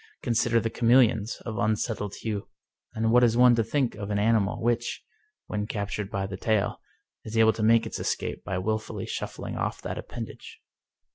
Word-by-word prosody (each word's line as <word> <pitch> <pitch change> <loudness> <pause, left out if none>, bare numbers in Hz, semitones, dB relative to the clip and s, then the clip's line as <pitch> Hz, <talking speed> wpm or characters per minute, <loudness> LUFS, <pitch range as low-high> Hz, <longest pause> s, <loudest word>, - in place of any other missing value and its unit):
Consider 115 -1 +2
the 115 0 -2
chameleons 115 -3 +3
of 110 -2 -4
un 110 -1 +2
settled 105 -2 -3
hue. 105 -3 -4 0.5
And 110 0 +1
what 125 +1 +6
is 115 -1 +4
one 125 0 +7
to 115 -1 +2
think 125 +2 0
of 100 -1 -6
an 105 - 0
animal 105 -1 +2
which, 120 +1 -1 0.4
when 105 0 -3
captured 100 -1 -3
by 100 -1 -2
the 95 -1 -6
tail, 110 0 0 0.4
is 110 +1 -5
able 110 0 +6
to - - -5
make 115 +1 +4
its 110 - -5
escape - - -3
by 95 - -3
willfully 110 +3 -2
shuffling - - -5
off - - -2
that - - -4
appendage - - -8
110 Hz, 185 wpm, -27 LUFS, 105-115 Hz, 0.5 s, one